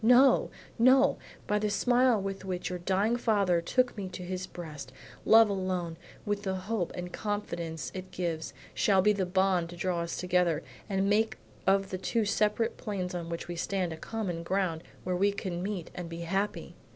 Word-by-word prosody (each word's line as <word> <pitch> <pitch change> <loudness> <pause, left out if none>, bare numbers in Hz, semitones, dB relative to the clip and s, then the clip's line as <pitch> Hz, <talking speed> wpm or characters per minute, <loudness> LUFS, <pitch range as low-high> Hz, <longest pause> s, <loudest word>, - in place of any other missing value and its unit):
No, 250 +4 +6 0.3
no; 255 +3 +5 0.3
by 210 0 +1
the 210 0 0
smile 245 +3 +3
with 195 0 -4
which 185 -1 -3
your 180 - -3
dying 195 +6 +1
father 200 -7 +2
took 250 +8 +1
me 200 -3 -4
to 180 - -7
his 185 +1 -4
breast, 150 -8 -8 0.3
love 225 0 +8
alone, 185 -4 -2 0.3
with 205 -1 -1
the 190 -2 -2
hope 185 -1 -2
and 180 0 -6
confidence 170 -7 -3
it 185 0 -6
gives, 170 -3 -3 0.2
shall 195 -3 +3
be 210 +1 +5
the 190 -3 -1
bond 185 -2 +2
to 175 - -8
draw 175 0 -1
us 170 0 -3
together 180 -3 +1 0.3
and 195 0 +1
make 215 +2 +2 0.3
of 195 0 +3
the 185 - -3
two 220 +4 0
separate 210 +2 +1
planes 190 -4 -3
on 170 -1 -4
which 170 0 -4
we 175 - -4
stand, 180 -1 -1
a - - -5
common 180 -1 -4
ground 170 -2 0 0.2
where 180 0 -1
we 200 +3 +3
can 185 -3 -4
meet 190 -3 -4
and 175 -2 -6
be 165 0 -6
happy." 195 +5 -2
190 Hz, 190 wpm, -30 LUFS, 175-210 Hz, 0.3 s, love